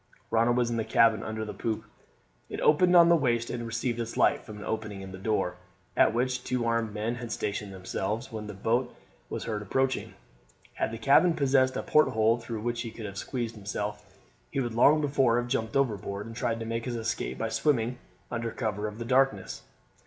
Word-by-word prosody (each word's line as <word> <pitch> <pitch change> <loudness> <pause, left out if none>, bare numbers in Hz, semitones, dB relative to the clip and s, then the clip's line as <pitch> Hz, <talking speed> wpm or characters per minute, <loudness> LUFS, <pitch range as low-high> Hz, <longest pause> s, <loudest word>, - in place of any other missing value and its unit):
Ronald 115 +2 +3
was 120 -1 +1
in 115 - -1
the 110 - 0
cabin 115 -2 +4
under 110 0 -4
the - - -6
poop; 110 -2 -3 0.7
it - - -5
opened 180 +4 +5
on 170 -1 +9
to - - +3
the 170 - +7
waist, 120 -6 +1
and 120 -1 -4
received 120 +1 -2
its 115 0 -4
light - - +3
from 105 - -9
an 105 - -8
opening 105 -3 -4
in 95 0 -8
the 95 - -8
door, 95 -3 -1 0.4
at - - +5
which 125 +2 -1
two 125 -2 -1
armed 115 -1 0
men 110 +2 -2
had 120 -2 -6
stationed 105 -1 -3
themselves 95 +6 -3
when 110 -2 -5
the 105 - -7
boat 120 +5 0 0.3
was - - -4
heard 105 -2 -3
approaching. 130 +6 -1 0.6
Had - - -1
the 115 - -6
cabin 150 +9 +5
possessed 130 -2 +3
a - - -2
porthole 115 -6 +3
through 115 -2 -5
which 120 +1 -2
he 115 - -4
could 110 -1 -8
have 100 -1 -6
squeezed 120 -2 -3
himself 105 0 -4 0.5
he 140 - -2
would 120 -3 -1
long 145 +6 +5
before 135 -5 +3
have 120 0 -1
jumped 110 -3 -2
overboard 105 -6 0
and 115 0 -9
tried 115 -1 -1
to 115 - -4
make 115 0 -3
his 125 -2 -3
escape 115 -1 -3
by 115 - -2
swimming 125 -2 +1 0.3
under 115 -1 -2
cover 105 -2 -2
of 105 0 -7
the 115 - -5
darkness. 115 - +1
115 Hz, 210 wpm, -28 LUFS, 105-125 Hz, 0.7 s, on